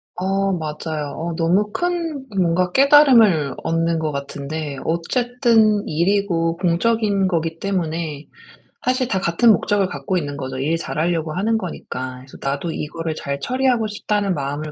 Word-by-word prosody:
어 195 +2 0
맞아요. 155 -2 -4
어 170 +1 -3
너무 185 +6 +1
큰 335 -5 -2 0.2
뭔가 180 0 +2
깨달음을 240 - +5
얻는 165 0 0
것 155 -1 -1
같은데 140 +1 -5
어쨌든 225 +4 +2
일이고 170 -1 +1
공적인 200 +3 +1
거기 165 -2 -1
때문에 165 -6 -3 0.6
사실 255 0 +1
다 190 -5 0
같은 185 +7 +4
목적을 205 -2 +1
갖고 140 +4 -3
있는 145 -4 -3
거죠 130 -1 -5
일 155 +5 0
잘하려고 165 -1 -2
하는 220 +5 +1
거니까. 130 -8 -6
그래서 130 - -14
'나도 140 +4 -2
이거를 160 +2 -4
잘 140 -2 -4
처리하고 250 - +1
싶다.'는 205 -2 -1
마음을 145 +1 -4
170 Hz, 315 characters per minute, -21 LUFS, 155-210 Hz, 0.6 s, 깨달음을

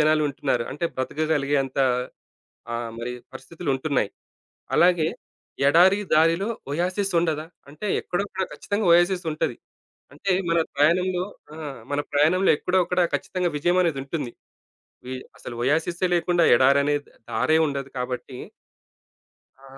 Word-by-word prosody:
జనాలుంటున్నారు. 145 -5 +1
అంటే 150 +5 -4
బ్రతకగలిగేంత 140 -1 0 1.0
ఆహ్, 115 -1 -3
మరి 120 +1 -4 0.2
పరిస్థితులు 170 -2 -7
ఉంటున్నాయి. 135 -6 0 0.7
అలాగే 175 -2 +4 0.6
ఎడారి 180 +7 +6
దారిలో 165 +6 +3 0.2
ఒయాసిస్ 185 +5 -1
ఉండదా? 160 -2 -1 0.2
అంటే 155 +9 -6
ఎక్కడో 180 +3 -2
అక్కడ 190 - -3
ఖచ్చితంగా 205 0 -2
ఒయాసిస్ 175 +1 +4
ఉంటది. 150 -6 -2 0.6
అంటే 155 +7 -3 0.2
మన 170 - +3 0.2
ప్రయాణంలో 180 +5 +2 0.3
ఆ! - - -10 0.4
మన 145 - +1
ప్రయాణంలో 160 +7 +3
ఎక్కడో 185 +1 +1
ఒక్కడ 180 +1 0
ఖచ్చితంగా 180 -2 -1
విజయమనేది 175 -1 +2
ఉంటుంది. 135 -3 -4 0.7
వి 130 - -5 0.2
అసలు 120 - -8
ఒయాసిసే 165 +7 +1
లేకుండా 175 0 +2
ఎడారనే 140 +3 +4 0.4
దారే 160 0 +2
ఉండదు 140 -1 -4
కాబట్టి 125 +1 -4 1.2
ఆ! - - -19
155 Hz, 115 wpm, -24 LUFS, 140-180 Hz, 1.2 s, ఎడారి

